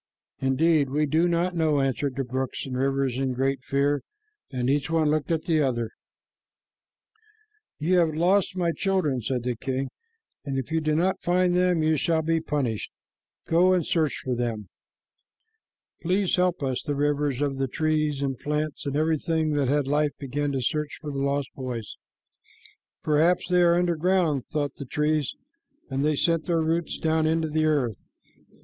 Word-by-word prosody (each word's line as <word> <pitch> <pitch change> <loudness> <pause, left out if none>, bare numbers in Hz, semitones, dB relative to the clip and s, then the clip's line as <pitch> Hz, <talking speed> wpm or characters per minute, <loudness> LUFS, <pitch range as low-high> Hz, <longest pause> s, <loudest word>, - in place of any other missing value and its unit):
"Indeed, 140 +2 +2
we 150 +3 +1
do 160 +4 +2
not 175 +1 0
know," 155 -3 +2
answered 135 0 -1
the 135 - -1
brooks 130 +1 -3
and 130 -2 -5
rivers 135 -1 0
in 135 -1 0
great 135 0 0
fear, 140 +1 +1 0.5
and 125 -2 -2
each 140 +1 +1
one 160 -2 +2
looked 155 -1 -1
at 160 -1 0
the 160 -3 +2
others. 120 -5 -1 1.9
"You 180 +4 +2
have 160 -3 +2
lost 185 +3 +2
my 175 -2 +1
children," 175 -9 0
said 125 +1 -2
the 125 0 -1
king, 130 +3 -3 0.5
"and 135 -2 -3
if 135 +3 -4
you 160 0 +1
do 155 0 +1
not 180 +4 +1
find 180 0 +2
them, 180 -3 +2
you 155 0 +2
shall 160 +2 +1
be 165 0 +1
punished. 135 -9 -2 0.6
Go 180 +3 +4
and 175 -4 +1
search 155 -4 +1
for 130 - 0
them." 115 -5 -3 1.3
"Please 185 +2 +1
help 180 -3 +1
us," 130 -2 -1
the 145 -2 -3
rivers 145 -1 0
begged 145 -1 +1
of 135 - -7
the 135 - +1
trees 155 0 0
and 135 -3 -2
plants, 150 0 -3
and 140 - -2
everything 160 +1 +1
that 145 -3 +1
had 145 +1 +2
life 145 +1 0
began 145 +1 -2
to 135 - -1
search 150 0 -2
for 150 -1 -6
the 140 - -4
lost 140 -1 0
boys. 125 -5 -5 1.1
"Perhaps 160 +4 +2
they 180 0 +4
are 170 -1 +5
under 175 -1 +1
ground," 165 -5 +1
thought 145 -2 -3
the 140 - -6
trees, 150 +1 0 0.6
and 135 +1 0
they 155 0 +2
sent 165 +2 +1
their 170 -2 +2
roots 165 +1 -1
down 160 0 +1
into 160 0 +1
the 155 +1 +1
earth. 135 - +1
150 Hz, 175 wpm, -26 LUFS, 135-165 Hz, 1.9 s, are